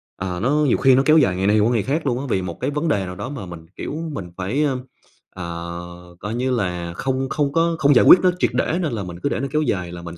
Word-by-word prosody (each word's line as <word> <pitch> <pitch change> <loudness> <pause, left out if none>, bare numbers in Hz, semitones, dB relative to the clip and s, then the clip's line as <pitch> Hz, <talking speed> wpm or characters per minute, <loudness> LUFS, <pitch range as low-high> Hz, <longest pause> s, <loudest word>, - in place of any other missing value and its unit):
ờ, 90 -1 -4
nó 125 - 0 0.2
nhiều 130 - +3
khi 130 -1 +5
nó 135 - +3
kéo 155 +1 +6
dài 100 - +3
ngày 95 +2 0
này 105 +1 +4
qua 110 +4 +3
ngày 115 -4 +1
khác 150 +3 -2
luôn 125 -1 0
á 140 - -5
vì 95 - +1
một 90 -2 -6
cái - - -1
vấn 150 +3 -2
đề 100 -10 +1
nào 90 0 -7
đó 100 +7 -6
mà 130 -10 -6
mình, 85 -2 -10
kiểu, - - -5 0.2
mình 90 -6 -6
phải, 110 +11 -1
ơ, 135 -3 0 0.6
ờ, 85 0 -7
coi 105 +3 -4
như 130 +1 -1
là 90 -7 -2
không 130 +5 -2
không 145 -2 -1
có 165 0 +2
không 145 0 +5
giải - - +6
quyết 185 - +9
nó 185 -1 +4
triệt - - +2
để 170 - 0
nên 155 -8 -2
là 105 -3 -3
mình 90 -1 -8
cứ 140 - +1
để - - -2
nó 135 - -2
kéo 155 0 +1
dài 90 - -2
là 85 0 -8
mình 85 0 -9
110 Hz, 295 wpm, -21 LUFS, 90-140 Hz, 0.6 s, quyết